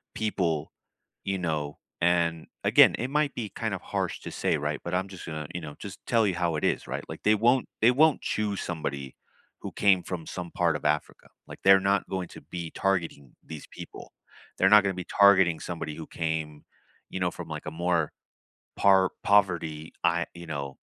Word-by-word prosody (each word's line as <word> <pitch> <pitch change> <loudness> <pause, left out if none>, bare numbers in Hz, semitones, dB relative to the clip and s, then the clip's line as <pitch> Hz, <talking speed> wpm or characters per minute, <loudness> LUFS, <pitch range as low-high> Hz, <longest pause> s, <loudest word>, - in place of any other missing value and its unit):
people, 85 -8 -1 0.5
you 95 0 -1
know, 75 -4 -2 0.2
and 85 -2 +1 0.2
again, - - +6
it 125 - -2
might 150 0 0
be 110 -4 -4
kind - - -2
of - - -4
harsh - - -3
to - - -7
say, - - 0
right? 75 +1 -2
But 85 - -5
I'm 95 +2 0
just 95 -2 -10
gonna, 75 -2 -5
you 90 - -4
know, 75 -2 -8
just 100 0 -8
tell 115 -2 +3
you 95 - 0
how 85 -2 0
it 75 - -3
is, - - 0
right? - - -4
Like, - - -7
they 105 +1 +5
won't 120 +4 +3
they 115 +3 +6
won't 155 +4 +4
choose 105 -2 -2
somebody 70 -5 -4 0.5
who - - -6
came 95 -3 +3
from 85 -3 -5
some 90 -2 -6
part 85 -3 +1
of - - -6
Africa, 75 0 -1 0.2
like, - - -10
they're 95 0 +7
not 100 +1 +1
going 95 -2 -3
to - - -12
be 85 +2 -7
targeting 85 -9 -2
these 80 -2 -9
people. - - -10 0.5
They're 95 - +4
not 105 0 +8
gonna 100 -1 0
be 90 -1 -5
targeting 95 -5 +6
somebody 80 -3 -5
who 80 - -8
came, 80 -2 -3 0.5
you 95 - -4
know, 90 -1 +1
from, - - -8
like, - - -6
a - - -3
more 85 -1 0 0.7
par 95 -1 +5
poverty, 85 -6 +2
I 85 0 +2
you 85 0 -9
know, 70 -3 -5
85 Hz, 200 wpm, -27 LUFS, 80-100 Hz, 0.7 s, not